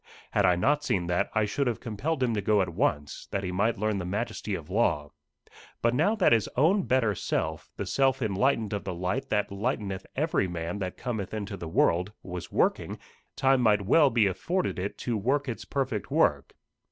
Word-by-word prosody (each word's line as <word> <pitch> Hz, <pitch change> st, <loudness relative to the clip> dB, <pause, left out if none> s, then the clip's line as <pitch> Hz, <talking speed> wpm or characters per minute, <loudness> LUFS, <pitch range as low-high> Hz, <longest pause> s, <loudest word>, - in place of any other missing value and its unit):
Had -, -, +3 dB
I 90 Hz, -, +4 dB
not 145 Hz, +12 st, +2 dB
seen 95 Hz, -11 st, 0 dB
that, 90 Hz, 0 st, 0 dB
I 110 Hz, -1 st, +3 dB
should 135 Hz, +7 st, -1 dB
have 120 Hz, -, -1 dB
compelled 130 Hz, +6 st, -2 dB
him 120 Hz, -2 st, +1 dB
to 105 Hz, -, 0 dB
go 105 Hz, 0 st, +3 dB
at 90 Hz, -, -4 dB
once, 75 Hz, -2 st, -1 dB
that 100 Hz, -, -2 dB
he 90 Hz, -, -2 dB
might 105 Hz, +5 st, +1 dB
learn 105 Hz, 0 st, 0 dB
the -, -, -3 dB
majesty 105 Hz, +1 st, -3 dB
of 80 Hz, -4 st, -7 dB
law. 75 Hz, -9 st, +1 dB, 0.7 s
But 115 Hz, 0 st, +3 dB
now 205 Hz, -, +2 dB
that 200 Hz, -5 st, +3 dB
his 115 Hz, -3 st, +3 dB
own 175 Hz, +8 st, +3 dB
better 125 Hz, -5 st, +2 dB
self, 80 Hz, -4 st, -2 dB
the -, -, -3 dB
self 135 Hz, -1 st, +2 dB
enlightened 110 Hz, 0 st, +1 dB
of 100 Hz, -, -2 dB
the 95 Hz, -3 st, -4 dB
light 95 Hz, +11 st, -2 dB
that 105 Hz, -2 st, 0 dB
lighteneth 100 Hz, -2 st, -3 dB
every 150 Hz, -, +1 dB
man 85 Hz, +2 st, -4 dB
that 95 Hz, -2 st, -4 dB
cometh 110 Hz, -5 st, -4 dB
into 105 Hz, -1 st, -4 dB
the 85 Hz, -4 st, -7 dB
world, 90 Hz, +3 st, +2 dB
was 90 Hz, -2 st, -7 dB
working, -, -, 0 dB, 0.4 s
time 135 Hz, -1 st, +3 dB
might 105 Hz, -3 st, +3 dB
well 145 Hz, -, +5 dB
be 115 Hz, -4 st, +3 dB
afforded 170 Hz, -, -1 dB
it 100 Hz, +3 st, -4 dB
to 120 Hz, -3 st, -2 dB
work 135 Hz, +7 st, 0 dB
its 120 Hz, -, -5 dB
perfect 130 Hz, -, -2 dB
work. -, -, +1 dB
105 Hz, 200 wpm, -28 LUFS, 95-130 Hz, 0.7 s, well